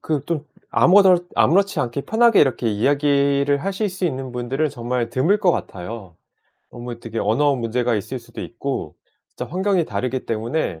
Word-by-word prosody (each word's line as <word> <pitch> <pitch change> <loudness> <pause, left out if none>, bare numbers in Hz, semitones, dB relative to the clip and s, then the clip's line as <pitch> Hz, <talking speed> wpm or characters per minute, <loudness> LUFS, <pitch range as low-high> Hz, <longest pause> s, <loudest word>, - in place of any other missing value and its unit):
그 150 -4 -2
좀 160 -3 -2 0.3
아무렇 185 -1 +5
아무렇지 195 +4 +3
않게 125 +1 -2
편하게 230 +3 +4
이렇게 130 -4 +2
이야기를 140 +4 +2
하실 195 +5 -2
수 185 0 -5
있는 130 -5 -3
분들은 125 +5 -1
정말 120 -1 -2
드물 160 - +2
것 190 -3 +3
같아요. 95 -1 -6 0.5
어 - - -12
뭐 120 0 -6
대개 115 -1 -6
언어 135 +8 +2
문제가 120 0 -1
있을 125 +6 -4
수도 120 - -11
있고 120 - -5 0.4
진짜 - - -6
환경이 190 0 +1
다르기 130 -3 -3
때문에 115 - -2
135 Hz, 350 characters per minute, -21 LUFS, 120-170 Hz, 0.5 s, 아무렇